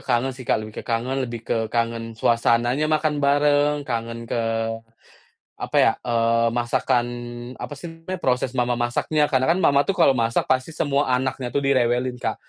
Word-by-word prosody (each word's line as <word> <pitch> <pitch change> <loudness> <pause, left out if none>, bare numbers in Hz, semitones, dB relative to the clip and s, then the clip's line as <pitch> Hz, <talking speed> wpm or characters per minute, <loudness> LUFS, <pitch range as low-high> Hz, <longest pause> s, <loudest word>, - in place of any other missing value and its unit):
kangen 125 +2 +1
sih, 130 0 -10
Kak, - - +4
lebih 110 0 -7
ke - - -12
kangen 120 +4 -1
lebih 120 -2 -6
ke - - +1
kangen 115 0 -2
suasananya 120 +5 +2
makan 155 -1 0
bareng, 145 +1 +3
kangen 115 -2 -3
ke, 115 -1 -1 1.0
apa - - -6
ya? - - +5
Eee, 115 -1 +2
masakan 120 0 +1 0.6
apa 145 - -6
sih 175 - -7
namanya? 165 +3 -7
Proses 125 -4 0
mama 120 0 +1
masaknya 120 +6 0
karena 130 -1 +2
kan 165 - +4
mama 140 -3 +4
tuh 195 - 0
kalau 170 -7 +5
masak 115 0 +1
pasti 130 +5 0
semua 145 -1 0
anaknya 130 0 -2
tuh 140 - +1
direwelin, 125 -2 +1
Kak. - - -2
125 Hz, 175 wpm, -23 LUFS, 115-140 Hz, 1.0 s, ya